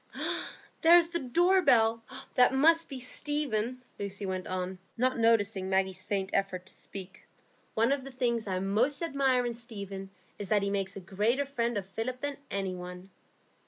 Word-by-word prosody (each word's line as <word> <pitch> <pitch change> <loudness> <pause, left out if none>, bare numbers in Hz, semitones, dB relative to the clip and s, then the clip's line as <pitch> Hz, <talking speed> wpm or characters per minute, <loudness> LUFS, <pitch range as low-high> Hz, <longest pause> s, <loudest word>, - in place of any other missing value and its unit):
"Ah, - - -3 0.3
there 335 +2 +8
is 335 -1 +3
the 340 0 -1
door 350 +8 +3
bell. 225 -6 +4 0.3
That 250 +1 +5
must 325 +4 +4
be 270 - -5
Stephen," 255 -3 -2 0.2
Lucy 200 0 -4
went 185 -1 -3
on, 185 0 -3 0.2
not 255 +1 +1
noticing 210 -4 +3
Maggie's 190 -1 +1
faint 195 -1 -1
effort 185 -2 0
to - - -6
speak. 190 -1 -8 0.5
"One 230 +4 +3
of 280 -1 0
the 270 - -8
things 240 -4 -1
I 185 -1 -1
most 220 - +1
admire 270 -5 +2
in 240 - -1
Stephen 200 -5 -7 0.3
is 200 -2 -5
that 205 -2 +3
he 200 - 0
makes 195 -1 -2
a 195 - -6
greater 215 +10 0
friend 240 -4 -1
of 195 - -3
Philip 225 +6 -4
than 285 0 -3
any 195 -2 -2
one." 180 +1 -8
225 Hz, 180 wpm, -30 LUFS, 195-260 Hz, 0.5 s, there